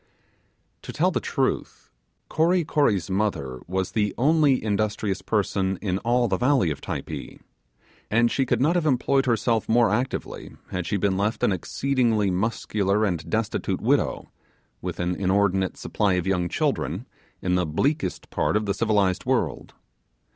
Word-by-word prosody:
To - - -7
tell - - +1
the - - 0
truth, - - -2 0.4
Kory 170 +3 +2
Kory's 110 - +1
mother 95 -11 -1
was 95 +1 -2
the 105 -2 0
only 145 0 +3
industrious 105 -2 -1
person 95 -3 0
in 95 -2 -1
all 120 +2 +2
the 95 -3 0
valley 125 - +2
of 70 - -6
Typee; - - -6 0.7
and 115 +2 +3
she 135 - +1
could 120 -2 +1
not 150 +6 +3
have 175 -3 +1
employed 135 0 +2
herself 115 -1 +1
more 115 -2 +4
actively 125 +5 -3 0.2
had 90 -2 -3
she 100 - 0
been 95 -1 +1
left 105 +3 -1
an - - +4
exceedingly 110 +1 0
muscular 105 +1 0
and 85 -6 -2
destitute 110 -1 -1
widow, - - 0 0.5
with - - -5
an 90 0 0
inordinate 95 0 +1
ate - - -24
supply 100 -3 0
of 90 -1 0
young 90 -2 0
children, - - -1 0.3
in 90 - -1
the 90 -2 +1
bleakest 145 - -1
part - - +1
of 105 - -2
the 100 - 0
civilized 100 -5 +1
world. - - -1
105 Hz, 155 wpm, -24 LUFS, 95-120 Hz, 0.7 s, more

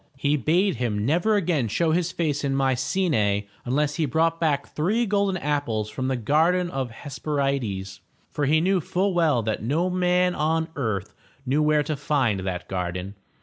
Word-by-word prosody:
He 140 +2 +1
bade 170 - +1
him 110 -4 -1
never 175 - +2
again 165 - +1
show 160 +9 +1
his 175 +1 +1
face 150 -4 -1
in 135 -1 0
Mycenae 130 - +1 0.2
unless 145 +4 0
he 160 -3 +1
brought 165 +5 +1
back 145 -4 0
three 210 +10 +1
golden 200 -2 +1
apples 130 -9 -1
from 130 -1 -3
the 130 - 0
Garden 165 +9 +2
of 135 -1 -2
the 115 - -14
Hes 140 +2 -8
per'i 140 -2 0
des, 95 -4 -5 0.3
for 145 -3 -1
he 155 +2 +3
knew 185 +1 +2
full 190 +5 0
well 155 -9 +2
that 110 0 -2
no 160 - 0
man 180 0 +2
on 160 +1 0
earth 105 -6 -2 0.3
knew 140 +4 +1
where 150 0 +3
to 155 +1 -2
find 135 -8 0
that 95 -2 -4
garden. 90 +1 -4
145 Hz, 185 wpm, -24 LUFS, 120-170 Hz, 0.3 s, he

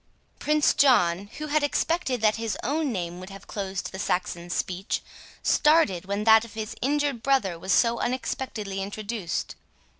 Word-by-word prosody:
Prince 300 0 +3
John, 200 -8 +3
who 305 - -4
had 305 0 +1
expected 290 -3 0
that 215 0 +3
his 225 -1 -3
own 290 +3 0
name 175 -4 -4
would 185 +1 -9
have 195 0 -11
closed 195 -2 -4
the 190 - -7
Saxon's 175 -2 -2
speech, 185 +2 -2 0.4
started 300 - +3
when 200 +2 -2
that 220 0 +7
of 230 -1 -11
his 220 0 -5
injured 285 -2 0
brother 225 -11 +1
was 190 +3 -3
so 235 -1 +3
unexpectedly 230 -5 -3
introduced. 200 -2 -4
220 Hz, 155 wpm, -26 LUFS, 190-270 Hz, 0.4 s, that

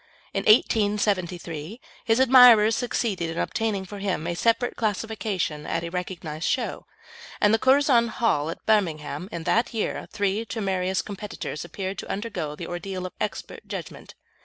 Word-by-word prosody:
In - - -2
1873 205 - +1 0.3
his 225 0 +3
admirers 245 -4 +7
succeeded 225 -8 -1
in 165 - -5
obtaining 210 -2 -1
for 205 +2 -8
him 190 -5 -2
a 175 - -1
separate 230 +6 +1
classification 205 -7 -2
at 165 - -1
a 170 - -4
recognised 170 -3 -4
show, - - -2 0.5
and 205 +1 +4
at 225 - +2
the - - -6
Curzon 260 -3 +4
Hall, 215 -10 0
at 165 - -7
Birmingham, 170 -5 0
in 170 -4 -5
that 230 +7 +1
year 220 - -2
three 205 +1 0
temerarious 190 -4 -1
competitors 200 -7 -6
appeared 190 +3 -5
to - - -7
undergo 195 -8 -4
the 170 - -7
ordeal 185 +2 -5
of 185 - -6
expert - - -5
judgment. - - -8
200 Hz, 155 wpm, -25 LUFS, 175-225 Hz, 0.5 s, admirers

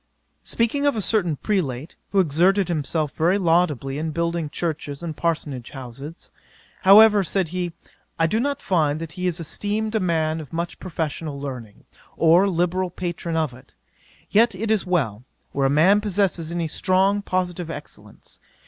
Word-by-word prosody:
'Speaking 280 +5 0
of 285 - +2
a - - -1
certain 180 -6 +2
Prelate, 150 - -2
who 200 - +2
exerted 185 +4 +3
himself 155 -2 -1
very 170 +8 +2
laudably 165 -7 +1
in 160 +1 -2
building 170 0 -2
churches 150 -2 -4
and 160 -2 -4
parsonage 150 -7 -2
houses; 135 +4 -9 0.5
"however, 205 +1 +7
said 185 -1 0
he, 180 0 -3 0.5
I 165 - +3
do 215 +7 +1
not 280 +3 -2
find 155 -5 +1
that 165 -1 -6
he 180 +2 -3
is 175 -1 -1
esteemed 210 +7 -2
a 220 - +2
man 160 -3 0
of 145 - -12
much 170 +1 -4
professional 155 -4 -4
learning, 125 -7 -8 0.3
or 170 +4 +5
a - - +1
liberal 180 +1 0
patron 170 -2 -4
of 155 -5 0
it; 125 - -17 0.6
yet, 225 0 +4
it 215 +3 -2
is 210 -4 +1
well, 125 - 0 0.3
where 135 -1 +1
a - - 0
man 175 +9 +4
possesses 190 -5 0
any 170 -1 -1
strong 195 +4 +2
positive 180 -3 -2
excellence. 150 -2 -10
170 Hz, 165 wpm, -23 LUFS, 155-190 Hz, 0.6 s, however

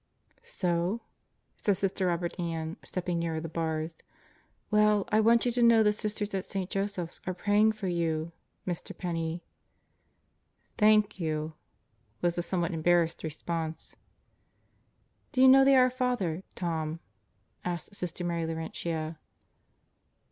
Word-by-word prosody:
"So?" 180 +5 -1 0.6
said 205 -3 +1
Sister 190 -1 0
Robert 175 0 -2
Ann, 165 -1 -3
stepping 180 -2 -2
nearer 165 -1 -1
the 165 - -5
bars. 160 0 -3 0.7
"Well, 210 -1 +4
I 215 - +4
want 230 +2 +4
you 245 - +2
to 240 +1 0
know 230 -1 +6
the 210 0 +4
Sisters 210 -1 -3
at 190 -1 -1
St. 195 -2 -4
Joseph's 195 -4 -2
are 185 - -1
praying 210 +3 +3
for 215 -2 -7
you, 165 -2 -1 0.3
Mr. 175 -2 -4
Penney." 170 -1 -3 1.3
"Thank 210 -2 +4
you," 155 -1 -2 0.7
was 175 -1 +1
the 175 - -1
somewhat 175 -1 -1
embarrassed 165 0 +2
response. 160 0 -4 1.4
"Do 260 - -1
you 260 - +8
know 270 +1 +8
the 275 0 +6
'Our 255 -1 +5
Father,' 245 -10 -1
Tom?" 160 -2 -2 0.6
asked 175 +2 -4
Sister 180 -1 -4
Mary 170 -2 -1
Laurentia. 160 0 -4
175 Hz, 130 wpm, -29 LUFS, 165-210 Hz, 1.4 s, you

